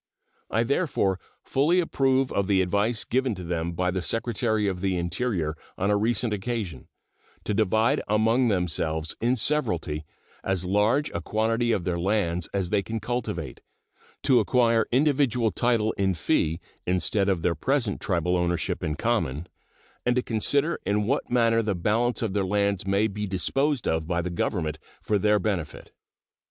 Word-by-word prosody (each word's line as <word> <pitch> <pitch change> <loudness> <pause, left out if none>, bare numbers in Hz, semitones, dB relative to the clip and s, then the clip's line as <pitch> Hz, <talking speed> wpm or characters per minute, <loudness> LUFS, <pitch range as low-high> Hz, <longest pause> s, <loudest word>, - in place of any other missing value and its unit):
I 115 +2 +1
therefore 120 - 0 0.2
fully 155 +7 +2
approve 135 -5 +1
of 100 -1 0
the 95 -2 +3
advice 105 +5 0
given 130 -2 0
to 90 - -7
them 85 0 -2
by 90 +1 0
the 95 0 -2
Secretary 110 0 0
of 95 -2 -2
the 95 -2 0
Interior 85 -3 -1 0.2
on 100 +2 +1
a - - +4
recent 110 +1 +1
occasion, 100 - -4 0.6
to - - -2
divide 110 +6 +2
among 110 +4 +3
themselves 80 -5 -1
in 120 +3 +2
severalty 90 - 0 0.4
as 95 -2 -1
large 105 +10 +2
a 85 - -3
quantity 115 +5 0
of 95 - 0
their 85 -1 -1
lands 90 -3 0
as 95 -3 -2
they 105 -2 +3
can 110 +3 -4
cultivate; 105 - -4 0.6
to 130 -4 +5
acquire 115 0 +3
individual 130 -4 +2
title 115 -3 +1
in 95 -2 +2
fee 80 0 0 0.3
instead 95 +3 +1
of 90 -4 0
their 85 - +2
present 120 - -1
tribal 90 -1 0
ownership 85 -1 -1
in 75 - -1
common, 85 - -1 0.6
and 125 0 +1
to 125 - +1
consider 140 +8 0
in 105 +2 +1
what 135 +6 -1
manner 115 -2 +3
the 105 -3 -1
balance 115 +7 0
of 105 -4 -1
their 100 -1 +1
lands 100 0 0
may 100 +2 +2
be 105 0 -3
disposed 135 - 0
of 80 -1 0
by 85 -1 0
the 90 +1 -2
Government 80 -3 -2 0.2
for 105 -1 0
their 105 +2 +3
benefit. 90 -6 -3
105 Hz, 165 wpm, -26 LUFS, 90-120 Hz, 0.6 s, to